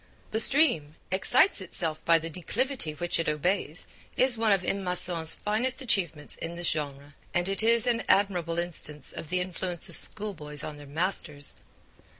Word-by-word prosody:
The 220 - -1
stream 230 - +4 0.2
'excites 245 - +3
itself 165 -4 -4
by 165 0 +5
the 165 0 -5
declivity 190 - -2
which 175 +1 -2
it 165 - 0
obeys' 155 +1 -1 0.3
is 255 -1 +3
one 225 -1 +1
of 195 -2 +2
M. 195 +1 -2
Masson's 175 -3 +2
finest 235 +6 -1
achievements 175 - 0
in 165 +1 -7
this 175 0 +1
genre, 145 -2 -5 0.2
and 175 +1 +1
it 195 +2 -1
is 230 +1 +6
an 240 -2 +1
admirable 180 -4 +1
instance 155 -5 0
of 155 - -8
the 185 0 +1
influence 180 -1 0
of - - +2
schoolboys 155 -9 -1
on 150 - -7
their 145 -1 -12
masters. 150 -2 -1
175 Hz, 165 wpm, -27 LUFS, 155-210 Hz, 0.3 s, is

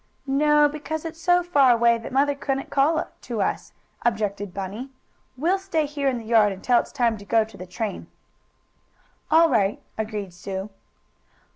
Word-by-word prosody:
"No, 295 +2 +4
because 305 +2 -5
it's 330 0 -7
so 355 +1 +3
far 285 -7 +4
away 235 0 +3
that 230 - -8
mother 280 +2 +2
couldn't 275 -1 -3
call 305 +4 +2
to 235 -3 -5
us," - - -3 0.3
objected 205 -4 -1
Bunny. 200 +8 -6 0.5
"We'll 350 +8 +1
stay 355 -5 -1
here 285 -1 -2
in 255 - -2
the 230 - -8
yard 220 -2 +4
until 235 +6 +2
it's - - -5
time 235 -6 0
to - - -11
go 225 +2 +3
to 215 -1 -13
the 185 -1 -9
train." 205 +3 -5 1.2
"All 325 +2 +6
right," 210 -8 +1 0.2
agreed 210 -4 -4
Sue. 190 +3 -6
245 Hz, 165 wpm, -24 LUFS, 210-295 Hz, 1.2 s, All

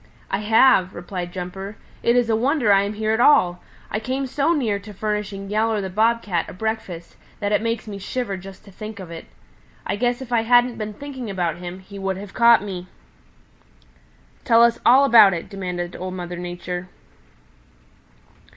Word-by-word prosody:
"I 195 - 0
have," 210 -3 +4
replied 175 0 -5
Jumper. 190 +3 -6 0.2
"It 235 - +2
is 245 -2 +3
a 225 - +2
wonder 245 -2 +2
I 195 - +5
am 200 +1 -2
here 215 +1 -1
at 220 - +1
all; 185 -10 +4 0.3
I 215 - -1
came 260 +4 -3
to 285 +6 +1
near 220 -7 0
furnishing 205 -1 -4
Yowler 215 +1 +1
the 190 -2 -4
Bob 230 +4 +2
Cat 175 -5 -2
a - - -9
breakfast 190 -4 -5 0.2
that 205 -1 -2
it 210 - +2
makes 230 -1 -2
me 200 -2 -6
shiver 215 +1 -3
just 190 +1 -11
to 200 - -14
think 215 +2 -8
of 180 -3 -9
it. 165 - -9 0.6
I - - -1
guess 245 +3 0
if 260 -2 -9
I 230 - +3
hadn't 245 +1 +3
been 210 -1 -5
thinking 265 -4 -7
about 175 -4 -2
him, 180 +1 -8
he 200 +1 -11
would 195 -1 -2
have 200 0 -9
caught 235 -3 +5
me." 185 -3 -6 1.6
"Tell 230 0 +5
us 235 0 +3
all 265 +3 +7
about 220 -7 +7
it," 165 - -6
demanded 180 -3 -5
Old 185 0 -5
Mother 175 -1 -6
Nature. 175 +1 -5
205 Hz, 185 wpm, -22 LUFS, 185-230 Hz, 1.6 s, all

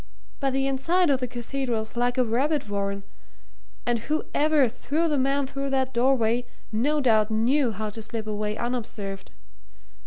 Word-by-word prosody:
But 270 -2 0
the 270 0 +1
inside 315 +6 +2
of 265 - +2
the 250 - -2
Cathedral's 240 -2 -3
like 245 +1 +1
a 255 - +4
rabbit 270 +4 +1
warren, 200 -1 -2 0.8
and 240 -1 +1
whoever 300 +1 +2
threw 295 +8 -1
the 295 -3 +1
man 275 +1 +2
through 275 +1 -3
that 265 -1 0
doorway 240 -1 +2 0.2
no 285 +8 +1
doubt 220 -4 +4
knew 240 +4 +2
how 215 0 -4
to 225 - -7
slip 220 0 -5
away 210 0 -2
unobserved. 215 -5 -4
245 Hz, 155 wpm, -26 LUFS, 220-275 Hz, 0.8 s, a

